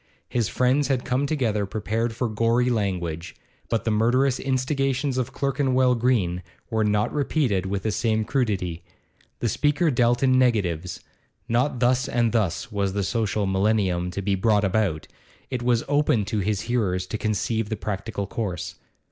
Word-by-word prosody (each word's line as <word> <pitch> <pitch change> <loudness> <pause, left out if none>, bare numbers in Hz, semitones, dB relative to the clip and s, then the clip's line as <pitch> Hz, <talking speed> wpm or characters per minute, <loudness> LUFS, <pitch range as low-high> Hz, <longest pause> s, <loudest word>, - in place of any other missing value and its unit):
His 120 -4 0
friends 130 +3 +2
had 130 -2 0
come 130 +3 0
together 115 -9 0
prepared 110 +3 -2
for 125 +1 -1
gory 115 +3 +1
language, 90 -6 -2 0.3
but 115 -3 0
the 115 - +1
murderous 125 +5 +2
instigations 135 0 0
of 125 - -2
Clerkenwell 130 -2 +2
Green 110 -8 +1 0.3
were 110 -1 +1
not 105 0 +1
repeated 135 - 0
with 95 0 -2
the 110 - 0
same 110 0 0
crudity. 100 - -1 0.6
The 120 - +1
speaker 145 - +2
dealt 120 0 +2
in 130 -1 +4
negatives; 90 -9 0 0.5
not 125 +2 +1
thus 125 +1 +2
and 120 -1 +1
thus 110 +2 -1
was 100 -2 -1
the 100 0 -1
social 105 0 0
millennium 95 -2 +1
to 100 +2 -5
be 100 +1 +1
brought 105 +2 +2
about, 95 -5 0 0.4
it 125 -2 -2
was 120 -1 +2
open 145 -7 +2
to 105 +1 -2
his 100 0 0
hearers 95 -7 0
to 110 +3 -5
conceive 110 +1 -1
the 110 - -2
practical 100 0 -4
course. 90 -5 -4
110 Hz, 160 wpm, -24 LUFS, 100-125 Hz, 0.6 s, in